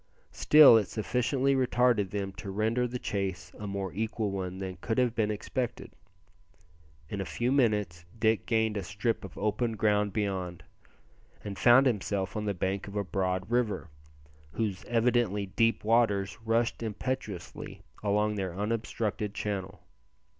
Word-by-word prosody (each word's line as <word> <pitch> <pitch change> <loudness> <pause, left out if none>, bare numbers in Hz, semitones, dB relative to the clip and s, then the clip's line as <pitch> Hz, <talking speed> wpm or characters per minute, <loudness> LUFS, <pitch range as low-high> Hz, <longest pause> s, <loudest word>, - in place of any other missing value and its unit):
Still, 150 -6 +8
it 105 -4 +1
sufficiently 125 +5 0
retarded 125 -5 +2
them 100 -1 -3
to 95 - -6
render 110 +5 0
the 125 +1 -4
chase 95 -5 -3
a 105 - -5
more 100 -2 -4
equal 110 0 -2
one 95 -1 -4
than 95 -1 -5
could 115 - -2
have 125 -3 +2
been 110 -3 0
expected. 120 +4 -3 1.2
In 100 +4 -4
a - - -1
few 120 +6 -1
minutes 105 -10 +1
Dick 110 -1 +1
gained 110 -2 +1
a 100 - -3
strip 100 +6 -2
of 95 - -10
open 110 +3 0
ground 105 -1 +2
beyond, 95 -5 -3 0.8
and 100 -1 -5
found 125 +3 +7
himself 100 -5 -1
on 105 -1 -2
the 100 -1 -1
bank 95 +3 -2
of 100 - -9
a 100 - 0
broad 95 +1 -2
river, 105 -9 0 0.6
whose 105 -5 -2
evidently 115 -4 +1
deep 115 +4 +1
waters 105 -3 +2
rushed 115 +1 0
impetuously 110 -3 -5 0.2
along 105 +1 +1
their 95 -3 -3
unobstructed 105 -1 -2
channel. 100 -2 -4
105 Hz, 145 wpm, -29 LUFS, 100-115 Hz, 1.2 s, Still